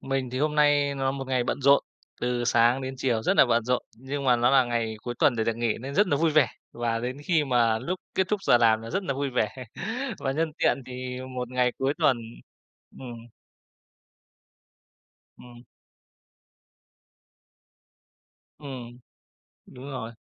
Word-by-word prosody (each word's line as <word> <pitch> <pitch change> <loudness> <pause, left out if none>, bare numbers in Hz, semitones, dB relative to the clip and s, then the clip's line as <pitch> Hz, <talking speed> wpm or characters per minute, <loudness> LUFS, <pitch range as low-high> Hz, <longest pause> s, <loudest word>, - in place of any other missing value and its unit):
Mình 135 -2 -2
thì 130 - -3
hôm 150 +2 0
nay 145 -1 +3
nó 135 -1 -1
một 135 -1 -5
ngày 130 -2 +1
bận 130 - -2
rộn, 140 +1 +5 0.4
từ 125 0 -1
sáng 120 +2 +3
đến 130 0 -4
chiều 120 -4 0
rất - - +1
là - - +7
bận 115 -1 +2
rộn. 125 +1 0
Nhưng 135 +4 -5
mà 125 -2 +4
nó 120 +1 +3
là 135 -1 +5
ngày 115 -2 -2
cuối 120 - -4
tuần 120 - +3
để 110 - 0
được 115 0 -1
nghỉ 115 -2 -1
nên 135 +4 -7
rất 205 - +4
nà 145 - +1
vui 160 +2 +2
vẻ, 150 -5 +4 0.2
và 120 -1 -1
đến 125 +3 -4
khi 165 -3 +2
mà 120 -4 +2
lúc 180 +10 -4
kết 190 - +1
thúc 210 -2 -1
giờ 120 - +5
làm 110 -2 +4
là 115 - -7
rất 195 - -1
là 140 - -1
vui 140 0 -2
vẻ. 125 +1 -2 0.5
Và 135 - -2
nhân 160 +2 -1
tiện - - +3
thì 125 0 -6 0.2
một 125 -1 -3
ngày 125 -1 +1
cuối 135 +2 0
tuần 130 - +3 0.8
ừm. 120 -3 -9 2.1
Ừm. 120 -1 -14 3.0
Ừm, 125 -4 -8 0.7
đúng 125 +1 -12
rồi. 115 -3 -6
125 Hz, 175 wpm, -26 LUFS, 120-140 Hz, 3.0 s, là